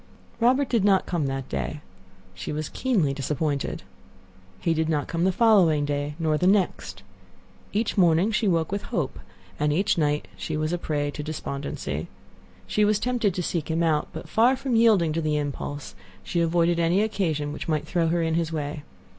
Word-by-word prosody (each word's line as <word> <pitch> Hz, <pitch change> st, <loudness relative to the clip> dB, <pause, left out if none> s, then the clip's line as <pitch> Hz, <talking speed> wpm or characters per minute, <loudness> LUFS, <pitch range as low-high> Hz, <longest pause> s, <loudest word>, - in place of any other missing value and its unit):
Robert 255 Hz, +4 st, +3 dB
did 230 Hz, -5 st, +1 dB
not 195 Hz, -2 st, +4 dB
come 165 Hz, -5 st, -1 dB
that 135 Hz, -1 st, -3 dB
day. 65 Hz, -3 st, -3 dB, 0.5 s
She -, -, -6 dB
was 150 Hz, 0 st, -3 dB
keenly 195 Hz, -, +1 dB
disappointed. 140 Hz, +1 st, -2 dB, 0.8 s
He 165 Hz, -, +1 dB
did 160 Hz, 0 st, 0 dB
not 150 Hz, -4 st, 0 dB
come 170 Hz, +1 st, 0 dB
the 190 Hz, -, +3 dB
following 180 Hz, -8 st, +4 dB
day, 145 Hz, 0 st, -2 dB
nor 155 Hz, -2 st, 0 dB
the 180 Hz, -, +2 dB
next. 195 Hz, -1 st, 0 dB, 0.7 s
Each 215 Hz, 0 st, 0 dB
morning 175 Hz, +4 st, +4 dB
she 220 Hz, 0 st, +1 dB
awoke 165 Hz, -3 st, +1 dB
with 200 Hz, 0 st, -1 dB
hope, 170 Hz, -, -2 dB, 0.4 s
and 150 Hz, 0 st, +2 dB
each 175 Hz, +3 st, +1 dB
night 150 Hz, -1 st, 0 dB
she 155 Hz, -, -4 dB
was 155 Hz, +2 st, -1 dB
a 175 Hz, -, -1 dB
prey 145 Hz, -3 st, -1 dB
to 150 Hz, -, -6 dB
despondency. 145 Hz, -2 st, -4 dB, 0.6 s
She 210 Hz, -, +1 dB
was 210 Hz, 0 st, +3 dB
tempted 230 Hz, -5 st, 0 dB
to 180 Hz, -, -2 dB
seek 170 Hz, -2 st, -2 dB
him 165 Hz, +1 st, +1 dB
out. 155 Hz, -2 st, +1 dB
But 160 Hz, -, -8 dB
far 240 Hz, +4 st, +4 dB
from 260 Hz, -2 st, -2 dB
yielding 210 Hz, -9 st, +4 dB
to 165 Hz, -, -1 dB
the 155 Hz, -1 st, 0 dB
impulse, 145 Hz, 0 st, -4 dB, 0.3 s
she 170 Hz, -, -1 dB
avoided 170 Hz, 0 st, +2 dB
any 170 Hz, +5 st, +3 dB
occasion 160 Hz, -9 st, -1 dB
which -, -, -6 dB
might 155 Hz, -2 st, 0 dB
throw 170 Hz, -2 st, 0 dB
her 170 Hz, +1 st, +1 dB
in 160 Hz, 0 st, 0 dB
his 165 Hz, -1 st, 0 dB
way. 150 Hz, -1 st, -3 dB
165 Hz, 190 wpm, -25 LUFS, 150-195 Hz, 0.8 s, not